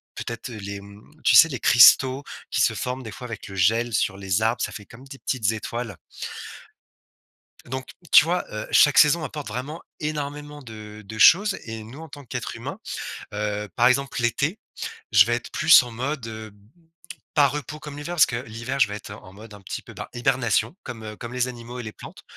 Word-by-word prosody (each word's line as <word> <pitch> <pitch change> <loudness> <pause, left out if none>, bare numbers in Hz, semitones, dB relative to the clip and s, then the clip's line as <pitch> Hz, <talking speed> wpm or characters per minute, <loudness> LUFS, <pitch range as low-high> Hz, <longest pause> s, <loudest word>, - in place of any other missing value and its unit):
peut-être, 120 +2 -6
heu, 115 - -8
les 100 0 -6
mmh, 100 +1 -14 0.2
tu - - +5
sais 165 - +10
les 130 - -4
cristaux 130 +2 +6 0.3
qui - - +1
se - - +3
forment 125 +1 -4
des 110 - -7
fois 125 +4 -8
avec 110 -3 -7
le 95 - -9
gel 115 +6 +2
sur 100 -2 0
les 95 +1 -1
arbres, 115 +2 +1
ça - - -2
fait 105 - -9
comme 125 +4 -14
des 135 0 -11
petites 115 -5 0
étoiles. 110 -2 -5 1.7
Donc, 130 +1 -5 0.2
tu - - +9
vois, 175 +2 0
heu, 105 - -5
chaque 145 -2 +5
saison 155 +2 +5
apporte 150 -1 -6
vraiment 145 +6 -5 0.2
énormément 150 -1 -5
de 110 -3 -10
de 110 +2 -8
choses 195 - +6
et 110 -1 -6
nous, 125 +8 -11
en 160 - -10
tant 145 0 -11
qu'être 125 - -5
humain - - -7 0.5
heu, 105 0 -3
par 120 - +4
exemple 135 +1 +1
l'été, 140 - 0 0.5
je 105 -1 +8
vais 120 - +1
être 120 - -8
plus 165 - +7
en 120 - -9
mode, 130 +2 -3
heu, 110 -1 -8 0.8
pas 145 -2 +6
repos 150 +2 -5
comme 150 -1 -8
l'hiver, 150 +4 -5
parce 155 - +7
que 125 - -5
l'hiver, 115 +5 -5
je 105 - +5
vais 105 - -5
être 105 - -9
en 95 -2 -12
mode 105 +2 -13
un 100 - -12
petit 95 - -6
peu, - - -13
bah, - - -7
hibernation, 120 -1 +1
comme, 115 -3 -8
heu, 105 -1 -7
comme 120 0 -8
les 125 0 0
animaux 120 0 -8
et - - -4
les 110 - -6
plantes, - - -12
120 Hz, 210 wpm, -24 LUFS, 110-140 Hz, 1.7 s, sais